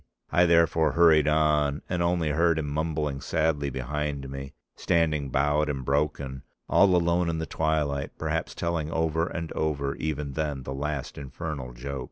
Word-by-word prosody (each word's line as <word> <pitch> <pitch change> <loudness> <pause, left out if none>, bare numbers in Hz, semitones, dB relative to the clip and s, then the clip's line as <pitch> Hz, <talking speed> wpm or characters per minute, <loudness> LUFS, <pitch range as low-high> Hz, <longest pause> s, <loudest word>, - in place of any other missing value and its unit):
I 90 0 +4
therefore 85 -1 +3
hurried 80 -3 +5
on, 75 -1 +2
and 90 -1 -1
only 85 -2 +1
heard 85 +2 +2
him 80 -2 -2
mumbling 75 -2 -2
sadly 75 -2 0
behind 70 +1 -3
me, 70 0 -7 0.2
standing 75 -5 +1
bowed 75 +3 +1
and 70 -3 -3
broken, 70 -1 -1 0.3
all 95 -2 +5
alone 85 0 +2
in 80 - -1
the 80 - -2
twilight, 75 -2 -1
perhaps - - -2
telling 85 -3 -2
over 80 0 0
and 85 -3 -5
over 70 -3 -1
even 75 -2 -3
then 75 -2 -2
the 65 - -5
last 70 0 -4
infernal 70 -2 -6
joke. 70 +3 -5
75 Hz, 160 wpm, -27 LUFS, 70-80 Hz, 0.3 s, hurried